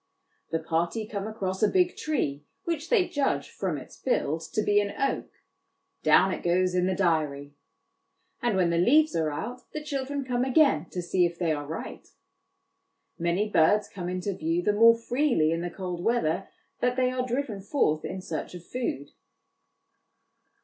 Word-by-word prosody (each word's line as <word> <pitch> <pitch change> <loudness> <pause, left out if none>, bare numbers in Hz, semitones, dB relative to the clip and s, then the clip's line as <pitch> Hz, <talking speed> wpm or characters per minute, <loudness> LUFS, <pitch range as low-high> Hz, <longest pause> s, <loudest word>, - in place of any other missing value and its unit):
The 165 - 0
party 170 +6 -1
come 205 -1 -4
across 190 -4 -3
a 215 - +5
big 360 - +2
tree 145 - -2 0.2
which 330 0 -3
they 395 -7 +4
judge, 285 -2 -1
from - - -2
its - - -11
build, 160 - 0
to 215 - +1
be 205 0 +4
an 200 0 -5
oak 275 - -1 0.7
down 190 +1 +5
it - - -5
goes 180 +1 +2
in 180 0 +2
the 185 - 0
diary; 150 -6 0 0.9
and 235 -5 +1
when 175 -2 +3
the 170 - +1
leaves 305 - +4
are 160 -2 +1
out, 240 +12 -6
the 305 - -4
children 280 -1 -3
come 245 -1 0
again 260 - +3
to 180 - -4
see 175 0 +2
if 170 0 -9
they 170 -2 0
are 145 -2 -3
right. 160 - -7 1.1
Many 170 +5 +1
birds 205 +3 +3
come 180 -2 -6
into 185 +2 -2
view 165 0 -1
the 210 - +2
more 230 +2 +7
freely 240 - +1
in 165 +1 -1
the 175 - -3
cold 180 -1 -5
weather 195 -6 +1 0.3
that 245 0 +1
they 255 0 +2
are 255 0 -1
driven 250 -4 -2
forth 190 - +1
in 185 - -5
search 165 +1 -5
of 175 -1 -10
food. 235 - -3
190 Hz, 175 wpm, -27 LUFS, 170-250 Hz, 1.1 s, more